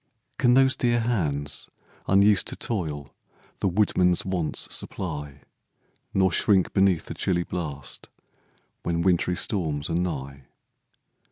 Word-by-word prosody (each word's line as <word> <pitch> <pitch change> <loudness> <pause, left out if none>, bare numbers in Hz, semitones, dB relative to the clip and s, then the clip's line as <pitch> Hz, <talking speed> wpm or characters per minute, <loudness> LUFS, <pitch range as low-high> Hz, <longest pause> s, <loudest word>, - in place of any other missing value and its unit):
Can 125 0 +4
those 135 0 +4
dear 120 -1 +1
hands, 75 -12 -1 0.4
unused 100 0 +4
to - - -1
toil, 75 - -3 0.5
The - - +1
woodman's 90 -2 +2
wants 90 -5 -1
supply, 75 -5 -4 0.7
Nor 95 -1 +2
shrink 95 +2 +2
beneath 95 -4 +3
the - - -6
chilly 85 -2 0
blast 75 -8 -6 0.7
When 85 0 -1
wintry 90 0 +2
storms 80 -7 -2
are - - 0
nigh? 70 -6 -3
90 Hz, 115 wpm, -25 LUFS, 75-95 Hz, 0.7 s, Can